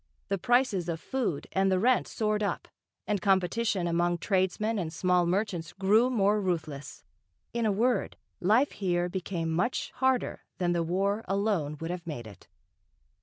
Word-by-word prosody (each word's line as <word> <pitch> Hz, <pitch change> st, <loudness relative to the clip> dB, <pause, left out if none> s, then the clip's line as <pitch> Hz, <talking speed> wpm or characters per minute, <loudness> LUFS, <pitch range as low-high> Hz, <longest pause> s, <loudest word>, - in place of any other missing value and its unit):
The 195 Hz, -1 st, 0 dB
prices 225 Hz, -6 st, +2 dB
of 165 Hz, -1 st, -2 dB
food, 235 Hz, -, -2 dB
and 190 Hz, 0 st, +2 dB
the 185 Hz, -, +3 dB
rent 245 Hz, +6 st, +3 dB
soared 215 Hz, -1 st, -1 dB
up, 205 Hz, -, -2 dB, 0.4 s
and 205 Hz, -3 st, -1 dB
competition 195 Hz, +1 st, +1 dB
among 175 Hz, +1 st, +1 dB
tradesmen 200 Hz, +4 st, 0 dB
and 165 Hz, -4 st, -3 dB
small 180 Hz, +1 st, +2 dB
merchants 180 Hz, -3 st, -1 dB
grew 210 Hz, +6 st, +3 dB
more 210 Hz, -3 st, +2 dB
ruthless, 160 Hz, -6 st, -4 dB, 0.5 s
in 235 Hz, -1 st, +1 dB
a -, -, +3 dB
word, 235 Hz, +5 st, 0 dB, 0.2 s
life 220 Hz, +9 st, +3 dB
here 175 Hz, -2 st, -1 dB
became 175 Hz, -3 st, -3 dB
much 180 Hz, +10 st, -1 dB
harder 260 Hz, -1 st, +1 dB, 0.2 s
than 175 Hz, -1 st, +1 dB
the 170 Hz, -1 st, +1 dB
War 195 Hz, +6 st, 0 dB
alone 195 Hz, -7 st, 0 dB
would 165 Hz, +1 st, -4 dB
have 180 Hz, -1 st, -6 dB
made 145 Hz, -8 st, -5 dB
it. 105 Hz, -4 st, -13 dB
190 Hz, 160 wpm, -29 LUFS, 175-215 Hz, 0.5 s, the